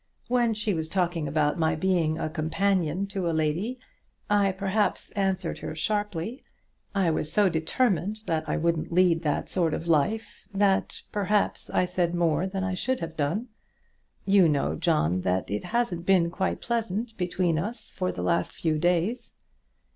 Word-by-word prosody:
When 240 -2 +2
she 210 -1 0
was 160 -2 -3
talking 175 -4 0
about 150 +3 +1
my 160 -1 +2
being 165 -2 +1
a 155 - -2
companion 175 +2 0
to 190 -3 -2
a - - 0
lady, 170 +11 -1 0.5
I 200 -1 +4
perhaps 195 +2 -1
answered 190 -4 -1
her 155 - -5
sharply. 210 - -2 0.5
I 190 -4 +3
was 155 -1 -2
so 205 -2 +4
determined 195 +4 0
that 160 -5 -1
I - - +1
wouldn't 165 0 0
lead 170 -1 +4
that 150 -3 -1
sort 170 -4 +1
of 165 - -5
life, 170 +8 0
that, 195 -1 +1
perhaps 205 0 0
I 180 - +2
said 180 -1 0
more 170 0 +1
than 190 0 -3
I 190 -1 -1
should 255 +8 -1
have 165 -1 -5
done. 165 - -1 0.8
You 195 -4 +5
know, 145 -2 +1
John, 85 +5 +1
that 90 +1 -1
it 105 - -2
hasn't 225 -8 -1
been 180 -3 +4
quite 190 +1 -2
pleasant 225 -1 -2
between 175 -3 0
us 215 +5 -5
for 185 -1 -2
the - - -5
last 170 - +1
few 155 -2 -1
days." 180 +8 0
180 Hz, 165 wpm, -27 LUFS, 160-200 Hz, 0.8 s, You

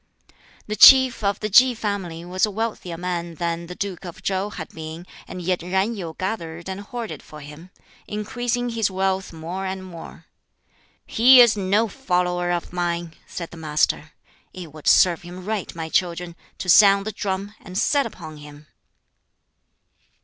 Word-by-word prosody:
The 215 - -4
Chief 260 -1 +8
of 200 0 0
the 215 - -2
Ki 250 +4 +6
family 190 -6 -4
was 185 +1 -3
a 215 - +5
wealthier 210 -5 -4
man 175 -1 -4
than 170 0 -3
the 180 - -8
Duke 195 -2 -5
of 175 -3 -10
Chow 195 +1 -1
had 160 -6 -8
been, 160 +2 -8 0.2
and 185 -1 -7
yet 180 +1 0
Yen 190 +6 0
Yu 170 -6 -6
gathered 170 -4 -4
and 190 +1 -5
hoarded 230 +2 -6
for 150 - -12
him, 150 +5 -12 0.4
increasing 245 +3 -2
his 225 -3 0
wealth 190 0 -1
more 175 +4 -5
and 190 0 -5
more. 170 -3 -11 0.8
"He 250 +3 +6
is 240 -3 +7
no 205 +3 +1
follower 180 -7 -1
of 175 0 -3
mine," 170 -2 -2
said 170 -2 -7
the 170 - -11
Master. 155 0 0 0.4
"It 175 -5 -9
would 155 -1 -10
serve 175 -3 +5
him 180 +1 -10
right, 210 -4 -3
my 165 -1 -4
children, 170 0 -1 0.2
to - - -6
sound 200 +2 +6
the 215 - -3
drum, 200 0 -4
and 185 -1 -8
set 280 +5 +2
upon 160 -7 -10
him." 150 0 -13
185 Hz, 165 wpm, -23 LUFS, 170-205 Hz, 0.8 s, Chief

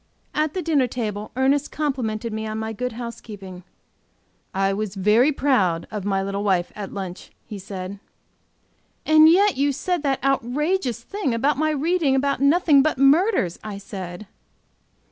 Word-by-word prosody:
At 305 +1 -1
the 370 - -2
dinner 290 -5 +2
table 215 -4 -4
Ernest 270 +3 +1
complimented 235 -7 -2
me 220 0 -3
on 215 0 -4
my 220 0 -3
good 250 +2 -4
housekeeping. 210 -6 -8 0.9
"I 195 0 +1
was 210 -1 -4 0.4
proud 190 -12 +2
of 210 -3 -5
my 195 -1 0
little 195 +1 -3
wife 185 -4 +1
at 205 -2 -6
lunch" 190 -2 -7 0.2
he 210 - -8
said. 190 0 -7 1.1
"And 310 0 +7
yet 390 +2 +4
you 285 +1 +2
said 355 +4 -2
that 275 -3 -1
outrageous 275 - 0
thing 385 - -2
about 275 +4 +1
my 310 0 +2
reading 310 -1 +1
about 280 +1 0
nothing 290 0 +5
but 310 0 0
murders!" 275 - +3
I 210 -2 -6
said. 190 -1 -8
245 Hz, 150 wpm, -23 LUFS, 200-290 Hz, 1.1 s, And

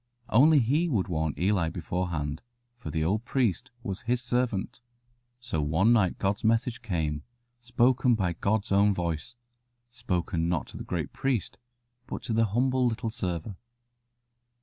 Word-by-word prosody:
Only 150 +7 +6
He 145 +8 +2
would 105 - 0
warn 80 -3 -1
Eli 90 -2 +1
before 90 +1 -3
hand, 75 -3 -3 0.4
for 125 - -7
the 80 -2 -1
old 105 +7 0
priest 120 -2 0
was 100 0 -4
His 120 +1 0
servant. 120 -4 -1 0.6
So 120 -11 -2
one 80 +10 +3
night 105 -6 +2
God's 100 +1 -1
message 115 +2 +1
came, 80 -9 -2 0.4
spoken 120 +1 +3
by 90 -5 0
God's 100 +5 -1
own 100 +1 +4
voice 85 +5 -3 0.6
spoken 90 -8 -1
not 90 -2 0
to - - -9
the - - -6
great 85 -4 -3
priest, 130 -7 -2 0.5
but - - -6
to 115 - -2
the 115 +1 +3
humble 125 +4 +2
little 115 0 -2
server. 95 -3 -4
105 Hz, 150 wpm, -28 LUFS, 90-120 Hz, 0.6 s, Only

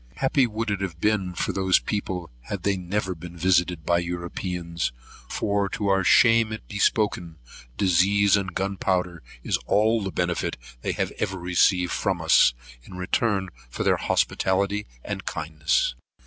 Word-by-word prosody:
Happy 135 -1 +2
would 110 0 -3
it 100 -1 -2
have 85 -4 -4
been 95 -3 0
for - - -1
those 95 -1 +3
people 90 -6 -3
had 100 -3 -5
they 100 -1 +2
never 95 +1 -2
been 85 +1 -10
visited 90 -2 +1
by 85 0 +3
Europeans; 85 -3 -3 0.4
for, 100 -1 0
to 100 0 -2
our 95 0 +3
shame 115 +3 +5 0.2
be 100 - -6
it - - -2
spoken, 90 -7 +1 0.4
disease 100 +2 +4
and 95 -3 -2
gunpowder 90 -3 -1 0.2
is - - 0
all 110 +2 +3
the 95 -1 -3
benefit 90 -2 -1 0.2
they - - -2
have - - -2
ever 95 - -1
received 90 0 +2
from 95 -3 -1
us, 80 -6 +5 0.3
in 75 - -12
return 95 +1 0 0.2
for - - -4
their - - +3
hospitality 100 +2 0 0.2
and - - -5
kindness. 75 -5 0
95 Hz, 155 wpm, -25 LUFS, 85-100 Hz, 0.4 s, shame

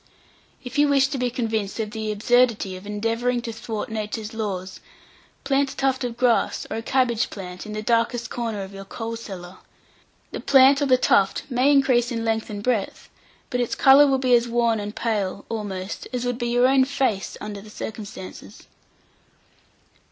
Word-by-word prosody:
If 265 +3 -4
you 295 - +5
wish 275 -1 +3
to 275 - -3
be 250 0 +1
convinced 225 -4 -2
of 215 -1 -2
the 220 -1 -3
absurdity 220 -2 +2
of 185 +2 -10
endeavouring 230 +4 -1
to 230 - -5
thwart 220 0 -5
nature's 220 0 -4
laws, 195 -4 -4 0.6
plant 275 0 +1
a - - -18
tuft 270 -1 0
of 240 -1 -4
grass, 240 -2 +1
or - - -2
a - - -3
cabbage 240 -2 +1
plant, 180 0 -8
in 215 - -6
the 215 0 -4
darkest 235 +1 0
corner 225 -5 -3
of 190 +1 -10
your 195 0 -8
coal 225 +3 -5
cellar. 190 -5 -9 0.7
The - - -5
plant 275 +1 +5
or 285 - +2
the 255 -1 +5
tuft 195 -5 +2
may 255 +3 +3
increase 255 -4 +3
in 230 -1 -2
length 225 -1 -1
and 205 -1 -6
breadth, 230 -5 -2 0.4
but 245 - -1
its 240 - -1
colour 280 +1 +7
will 270 -1 +2
be 255 -1 +2
as 240 0 +4
wan 235 -1 +1
and 205 +1 -6
pale, 205 -4 -2
almost, 205 -3 -5
as 250 -1 -3
would 245 0 -2
be 240 - -1
your 245 +1 +4
own 265 0 +4
face 260 -9 -1
under 205 -1 -6
the 210 - -13
circumstances. 210 -3 -8
230 Hz, 185 wpm, -23 LUFS, 210-250 Hz, 0.7 s, colour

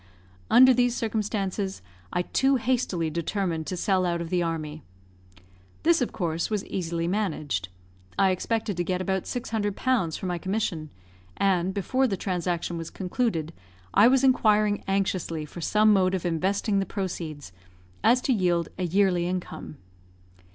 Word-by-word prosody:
Under 260 +1 +8
these 245 0 +2
circumstances, 205 - -2 0.3
I 180 - 0
too 270 +8 +2
hastily 230 -10 0
determined 170 0 -2
to 185 - -3
sell 185 +1 +1
out 170 -1 0
of 170 -1 -5
the 180 -1 +2
army. 155 -2 -3 1.0
This, 335 -2 +4
of 245 - 0
course, 170 -3 -2
was 210 -2 -2
easily 170 -2 -2
managed. 155 - -2 0.5
I 195 -1 +4
expected 210 +1 -1
to 175 - +1
get 180 +1 -1
about 190 0 -1
600 220 -4 -2
pounds 230 -12 0
for - - -6
my 175 -1 -2
commission; 185 -5 -2 0.5
and, 190 -2 +2
before 255 +7 +1
the 195 -5 -2
transaction 175 -2 -2
was 165 - -6
concluded, 180 - -2 0.4
I 205 +4 +7
was 265 +1 +4
inquiring 215 -5 +3
anxiously 185 -5 -1
for 170 +3 -9
some 215 +5 +4
mode 190 -1 +3
of 180 - -4
investing 195 +5 0
the 195 - -1
proceeds, 165 - -5 0.5
as 245 +2 +5
to 265 - +1
yield 175 -5 +1
a 180 - 0
yearly 180 -1 +2
income. 175 -4 -5
190 Hz, 150 wpm, -26 LUFS, 170-215 Hz, 1.0 s, Under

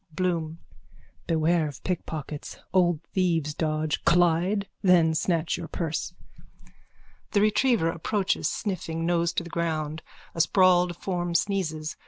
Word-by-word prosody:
_ - - -18
BLOOM: 165 -3 -1 0.7
Beware 165 0 +2
of 145 - -9
pickpockets. 155 -4 -5 0.2
Old 175 -4 +2
thieves' 165 -5 +1
dodge. 155 0 -1
Collide. 175 +4 +3
Then 175 -4 +4
snatch 165 0 0
your 170 -2 -6
purse. 160 0 -3 1.2
_(The 205 - +4
retriever 215 -2 +3
approaches 190 +4 -1
sniffing, 165 -5 -3
nose 170 0 +1
to - - -1
the 170 - -10
ground. 160 -2 -2 0.3
A 165 - +1
sprawled 180 0 +4
form 175 -2 -3
sneezes. 165 -6 -1
170 Hz, 125 wpm, -26 LUFS, 160-180 Hz, 1.2 s, Then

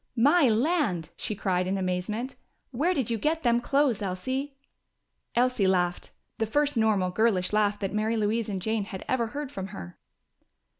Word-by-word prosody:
"My 285 +4 +5
land!" 225 - +1
she 215 - -3
cried 185 -2 0
in 195 +1 0
amazement. 190 +7 -2 0.4
"Where 315 +9 +1
did 250 -6 -1
you 225 - 0
get 320 +6 0
them 240 -1 +3
clothes, 275 -5 +2
Elsie?" 260 +9 -3 0.8
Elsie 245 -5 +2
laughed; 180 -2 0 0.3
the 225 - +1
first 290 +5 +1
normal, 210 -5 +2
girlish 200 -2 +1
laugh 210 -1 +2
that 195 -1 -3
Mary 215 +2 0
Louise 215 +1 0
and 190 -3 -3
Jane 220 -1 0
had 195 -2 -8
ever 240 -3 +1
heard 285 +3 -5
from 190 -7 -5
her. 90 - -9
220 Hz, 165 wpm, -27 LUFS, 190-260 Hz, 0.8 s, My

